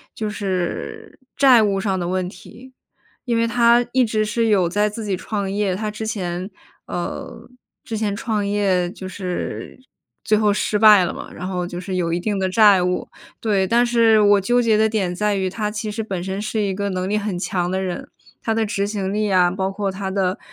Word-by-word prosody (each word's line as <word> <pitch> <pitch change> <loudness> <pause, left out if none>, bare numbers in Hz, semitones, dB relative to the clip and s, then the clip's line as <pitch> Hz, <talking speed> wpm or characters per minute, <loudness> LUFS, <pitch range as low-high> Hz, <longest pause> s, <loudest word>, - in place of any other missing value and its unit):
就 215 - -3
是 210 - -4 0.2
债 265 -4 +6
务 200 -2 +1
上 190 -2 -1
的 175 - -2
问 185 0 -1
题。 260 +6 -14 0.5
因 235 -2 0
为 230 0 +2
他 235 +1 +4
一 260 0 +4
直 215 -1 0
是 225 +2 0
有 195 -5 +3
在 205 +3 +1
自 215 +1 -6
己 195 - 0
创 200 0 -3
业， 200 -2 0
他 215 +2 -3
之 220 +1 -6
前， 185 -2 -3 0.4
呃， 175 +6 -6 0.4
之 225 - -5
前 210 -2 -1
创 210 -2 -2
业 195 -3 +1
就 190 - -8
是 185 +4 -5 0.4
最 215 - +3
后 210 -1 +3
失 210 0 0
败 210 -4 +7
了 - - -3
嘛， - - -9
然 180 - -6
后 180 -2 -2
就 175 0 -6
是 185 +1 -5
有 170 -2 0
一 175 - 0
定 205 +2 -2
的 190 -1 0
债 205 -2 +6
务。 180 0 -1 0.3
对， 200 -4 +1
但 235 +4 +3
是 230 -2 +4
我 205 -1 +5
纠 245 +5 +2
结 225 -2 +3
的 220 0 +3
点 195 -5 -1
在 210 +2 0
于 190 -1 -1
他 210 +2 -3
其 215 0 -4
实 220 +1 -3
本 190 -5 -4
身 190 +2 -3
是 215 +1 -2
一 200 -2 0
个 200 +1 -2
能 185 -1 -2
力 210 - 0
很 205 -3 -2
强 180 -1 -1
的 190 - 0
人， 185 -2 -4 0.3
他 225 - -1
的 225 - +1
执 200 -1 -1
行 200 -2 -3
力 210 -1 0
啊， 180 -2 +4
包 190 +1 -2
括 195 0 -2
他 190 0 -4
的 190 -1 0
205 Hz, 235 characters per minute, -21 LUFS, 185-220 Hz, 0.5 s, 败